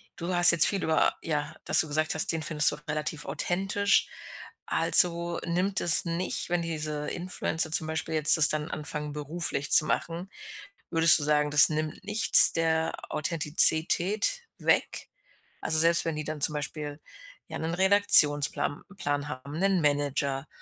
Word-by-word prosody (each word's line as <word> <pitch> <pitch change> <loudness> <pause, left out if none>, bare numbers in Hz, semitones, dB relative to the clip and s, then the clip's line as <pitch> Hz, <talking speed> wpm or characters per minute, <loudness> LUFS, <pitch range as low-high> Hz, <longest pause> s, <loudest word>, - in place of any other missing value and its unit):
du 180 0 -7
hast 175 0 +9
jetzt 170 -3 +3
viel 200 -2 -3
über 160 -1 -1
ja, 150 -2 -6
dass - - +4
du 160 - -6
gesagt 155 +2 -3
hast, 160 - +1
den 165 -1 -6
findest 150 -1 0
du - - -8
relativ 150 0 -6
authentisch. 195 +7 -3 0.6
Also, 170 -1 +2
nimmt 185 +3 -3
es 170 0 +5
nicht 170 +2 -5
wenn 175 0 -3
diese 155 -2 -6
Influencer 165 -3 -3
zum 155 0 +2
Beispiel 160 0 -6
jetzt 155 +1 +6
das 155 -2 +5
dann 155 +1 -3
anfangen, 150 0 -7
beruflich 150 -1 -5
zu 155 - +5
machen 170 +4 -6 0.6
würdest 165 0 +5
du - - -5
sagen, 150 0 -2
das 150 +1 +6
nimmt 155 0 -7
nichts 215 +2 +5
der 160 0 -3 0.2
Authentizität 170 - +1 0.2
weg? - - -3 0.5
Also, 160 0 -1
selbst 170 +1 +1
wenn 165 -2 -5
die 155 - -6
dann 155 -1 -9
zum 155 - +2
Beispiel, 150 0 -7 0.5
ja, - - -9
'nen 160 +1 -6
Redaktionsplam 175 -8 +4
Plan 145 -3 -5
haben, 135 +1 -11
'nen 195 -1 -1
Manager 145 -1 -4
160 Hz, 155 wpm, -24 LUFS, 150-170 Hz, 0.6 s, hast